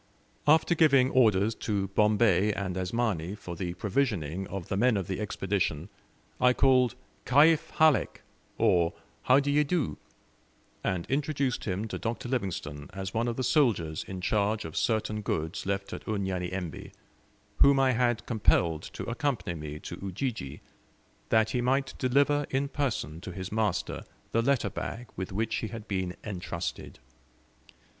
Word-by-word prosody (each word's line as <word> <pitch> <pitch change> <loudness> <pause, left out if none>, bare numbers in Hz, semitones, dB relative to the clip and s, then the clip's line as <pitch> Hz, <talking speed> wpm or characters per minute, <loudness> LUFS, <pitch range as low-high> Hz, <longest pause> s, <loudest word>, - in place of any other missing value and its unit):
After 160 +3 +5
giving 140 -5 +4
orders 110 -4 +4
to 100 -3 -2
Bombay 105 -1 +3
and 95 -3 -3
Asmani 95 -2 -1
for 90 -4 -8
the 90 0 -4
provisioning 95 - -1
of 95 -3 -6
the - - -2
men 120 +2 +3
of 95 - -2
the 95 +2 -4
Expedition, 95 -5 -1 0.5
I 125 0 +5
called 125 -3 +4 0.3
"Kaif 150 +4 +4
Halek," 155 -3 +3 0.4
or 85 -2 +3 0.3
"How 130 +2 +6
do 145 0 0
ye 150 +1 +4
do," 145 - -1 0.8
and 90 -3 -1
introduced 140 -2 -1
him 100 +2 -2
to - - -5
Dr. 115 +1 -3
Livingstone 80 - -3
as 95 -1 -5
one 115 +2 0
of 120 - -1
the 130 - -2
soldiers 105 - +2
in 95 -1 -7
charge 105 +2 0
of 80 - -7
certain 110 -1 0
goods 80 -1 -3
left 100 0 -2
at - - -8
Unyanyembe, 95 -4 -3 0.7
whom 140 -1 +6
I 135 -1 +4
had 120 -1 +1
compelled 85 -8 +2
to - - -5
accompany 125 -6 -2
me 75 -2 -6
to 85 - -7
Ujiji, 95 - -4 0.7
that 110 -1 +3
he 125 - 0
might 135 +2 +1
deliver 140 +3 +2
in 135 +1 0
person 110 - -2
to 90 - -7
his 95 +1 -6
master 110 -3 -1 0.3
the 115 - +2
letter 135 +1 +1
bag 120 +1 -5
with 95 +1 -5
which 110 +3 -1
he 110 - -3
had 110 0 -8
been 95 -2 -2
entrusted. 90 -3 -5
105 Hz, 150 wpm, -29 LUFS, 95-125 Hz, 0.8 s, How